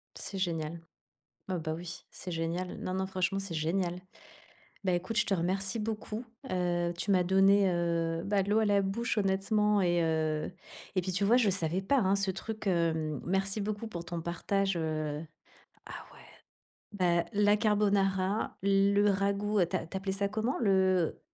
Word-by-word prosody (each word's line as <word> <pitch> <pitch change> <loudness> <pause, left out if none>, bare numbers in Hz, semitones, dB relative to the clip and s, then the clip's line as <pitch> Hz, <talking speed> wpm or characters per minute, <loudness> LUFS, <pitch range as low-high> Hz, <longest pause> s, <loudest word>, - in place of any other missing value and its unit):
C'est 195 - -6
génial. 165 -3 -2 0.7
Oh, 185 - 0
bah, 160 -1 -3
oui, 175 +1 -8
c'est 180 - -8
génial. 165 +2 -3
Non, 185 - -3
non, 190 0 -1
franchement, 190 +1 -1
c'est 195 -4 -5
génial. 175 +3 -1 0.8
Bah, 185 - +2
écoute, 185 +5 -2
je - - +3
te 195 - +2
remercie 190 +4 -1
beaucoup. 220 +1 -4 0.3
Heu, 175 -1 0
tu 200 - -2
m'as 185 -2 +4
donné, 195 +1 +5
heu, 170 -1 0
bah, 200 0 +2
l'eau 205 +3 +2
à 220 - +3
la 200 -1 +3
bouche, 215 +3 -1
honnêtement 205 +1 +2
et 175 -2 +2
heu, 155 0 0 0.4
et 185 - +3
puis, 185 0 -3
tu 200 +2 +1
vois, 230 +5 +5
je 230 -5 +4
savais 180 0 -1
pas, 275 +7 +2
hein, 195 -2 +3
ce 195 -1 0
truc, 215 +3 -6
hem, 160 -4 0
merci 195 +3 0
beaucoup 210 +2 -3
pour 170 -4 -6
ton 170 -1 -4
partage, 195 +3 -1
heu, 155 -1 -2 0.6
ah, - - -8
ouais. - - -16 0.7
Beh, 175 -3 +2
la 205 0 +4
carbonara, 200 -2 +1
le 200 +1 +4
ragoût, 200 0 +1
tu 175 - -4
a 165 -3 -2
tu 190 - -5
appelais 190 0 -3
ça 200 0 0
comment? 220 +5 -1
Le 190 -5 +2
190 Hz, 175 wpm, -30 LUFS, 175-200 Hz, 0.8 s, donné